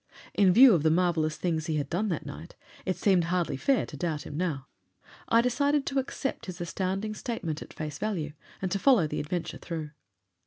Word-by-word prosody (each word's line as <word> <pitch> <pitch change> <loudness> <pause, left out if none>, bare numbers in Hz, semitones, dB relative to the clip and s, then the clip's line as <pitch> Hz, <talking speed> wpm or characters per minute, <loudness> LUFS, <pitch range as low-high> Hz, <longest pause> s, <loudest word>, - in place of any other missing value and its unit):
In 195 -3 +5
view 245 +4 +8
of 170 - +3
the 160 - +3
marvelous 160 -2 +2
things 160 -3 -1
he 160 - 0
had 145 -2 -1
done 185 +7 -1
that 165 - -2
night, 155 +4 -9 0.3
it 185 - 0
seemed 185 -4 +3
hardly 170 -4 0
fair 260 - +2
to - - -10
doubt 160 -4 -2
him 145 - -7
now. 150 -6 -2 0.6
I 230 - +6
decided 280 +4 +1
to 275 0 0
accept 270 -2 -4
his 180 -1 -6
astounding 190 +4 -2
statement 180 - -4
at - - -9
face 150 -2 -6
value 175 -9 -2 0.3
and 185 - -1
to 200 - 0
follow 240 - +5
the 150 - -3
adventure 165 +3 -3
through. 160 -3 -5
175 Hz, 200 wpm, -28 LUFS, 155-215 Hz, 0.6 s, view